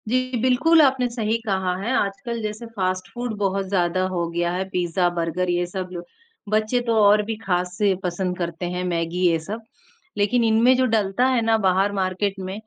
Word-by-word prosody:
जी, 255 +1 0
बिल्कुल 260 +6 +4
आपने 265 -3 +3
सही 225 -2 -1
कहा 190 -3 0
है। 230 +5 -2
आजकल 200 +4 -2
जैसे 215 +2 -5
फास्ट 185 -2 -1
फूड 240 -1 -4
बहुत 195 -1 -1
ज़्यादा 185 -1 +1
हो 170 -1 0
गया 175 +1 -1
है 180 +2 -1
पिज्जा, 175 -1 0
बर्गर 175 +1 -2
ये 175 0 +1
सब 185 +1 -5
जो 175 -1 -6 0.5
बच्चे 215 +3 +1
तो 230 - +2
और 205 +1 +5
भी 225 +1 -3
खास 180 -2 -1
से 205 -2 +3
पसंद 180 0 -2
करते 170 0 -4
हैं 180 - -2
मैगी 170 -1 -2
ये 165 -1 +3
सब। 210 +8 -6 0.6
लेकिन 225 +4 +2
इनमें 230 +3 +4
जो 260 - +3
डलता 220 0 +1
है 255 -2 +2
ना 225 0 +3
बाहर 195 0 +2
मार्केट 190 +2 -1
में 190 0 -5
195 Hz, 195 wpm, -23 LUFS, 180-225 Hz, 0.6 s, और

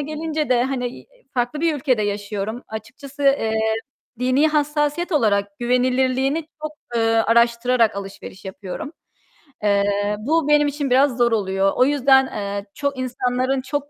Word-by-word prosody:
gelince 305 +1 -3
de 245 -1 +3
hani, 250 -2 -4 0.3
farklı 245 +4 -1
bir 330 -2 +2
ülkede 255 -5 +1
yaşıyorum. 205 +3 -3
Açıkçası, 260 +6 -8
eee, 275 -5 +3 0.7
dini 255 +5 +3
hassasiyet 300 +3 0
olarak 200 -7 +1
güvenilirliğini 255 +4 +1 0.2
çok, 310 0 -4 0.2
eee, 230 - +2
araştırarak 235 0 +3
alışveriş 195 -1 -8
yapıyorum. 190 - -7 0.7
Eee, 205 0 +1
bu 310 +6 +1
benim 295 0 +4
için 285 -1 -2
biraz 260 0 +3
zor 240 -1 +3
oluyor. 195 -2 +1
O 255 - +4
yüzden, 270 -2 +4
eee, 200 -1 -4
çok 280 -2 -2
insanların 255 +1 -1
çok 285 +2 -4
255 Hz, 135 wpm, -21 LUFS, 220-285 Hz, 0.7 s, benim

